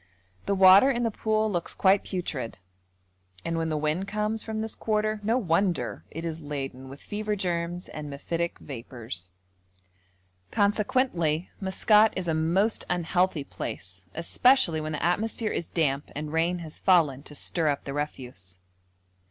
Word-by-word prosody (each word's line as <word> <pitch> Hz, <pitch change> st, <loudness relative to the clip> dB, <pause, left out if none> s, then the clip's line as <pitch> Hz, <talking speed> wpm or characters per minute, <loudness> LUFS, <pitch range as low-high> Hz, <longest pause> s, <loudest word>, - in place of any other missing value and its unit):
The 200 Hz, -, +2 dB
water 190 Hz, +6 st, +8 dB
in 240 Hz, -3 st, +1 dB
the 230 Hz, -, +1 dB
pool 215 Hz, 0 st, 0 dB
looks 175 Hz, -3 st, -2 dB
quite 195 Hz, +1 st, +4 dB
putrid, 140 Hz, -, -4 dB, 0.9 s
and 165 Hz, -, -1 dB
when 165 Hz, 0 st, -1 dB
the 155 Hz, -, 0 dB
wind 155 Hz, +6 st, -1 dB
comes 210 Hz, +2 st, -1 dB
from 220 Hz, -1 st, -4 dB
this 220 Hz, 0 st, -3 dB
quarter 215 Hz, 0 st, 0 dB
no 225 Hz, +4 st, +2 dB
wonder 180 Hz, -4 st, 0 dB
it 165 Hz, +2 st, -6 dB
is 165 Hz, -1 st, -3 dB
laden 135 Hz, -3 st, -5 dB
with 135 Hz, +1 st, -10 dB
fever 210 Hz, 0 st, -2 dB
germs 175 Hz, -2 st, -2 dB
and 150 Hz, -1 st, -7 dB
mephitic 165 Hz, +4 st, -3 dB
vapours. 115 Hz, -8 st, -7 dB, 1.2 s
Consequently, 200 Hz, -, +1 dB
Maskat 210 Hz, +3 st, +4 dB
is 185 Hz, -2 st, -3 dB
a 165 Hz, -, +2 dB
most 175 Hz, +8 st, +1 dB
unhealthy 180 Hz, -2 st, +1 dB
place, 90 Hz, -7 st, -6 dB
especially 170 Hz, 0 st, +3 dB
when 155 Hz, 0 st, -3 dB
the 150 Hz, -, -3 dB
atmosphere 215 Hz, +4 st, 0 dB
is 170 Hz, -, -3 dB
damp 145 Hz, -4 st, 0 dB
and 150 Hz, +1 st, -4 dB
rain 170 Hz, +2 st, +2 dB
has 155 Hz, -, -10 dB
fallen 160 Hz, -8 st, +4 dB
to 150 Hz, +1 st, -11 dB
stir 165 Hz, +2 st, -1 dB
up 145 Hz, -2 st, 0 dB
the 140 Hz, -, -5 dB
refuse. 125 Hz, -11 st, -5 dB
170 Hz, 150 wpm, -27 LUFS, 150-205 Hz, 1.2 s, water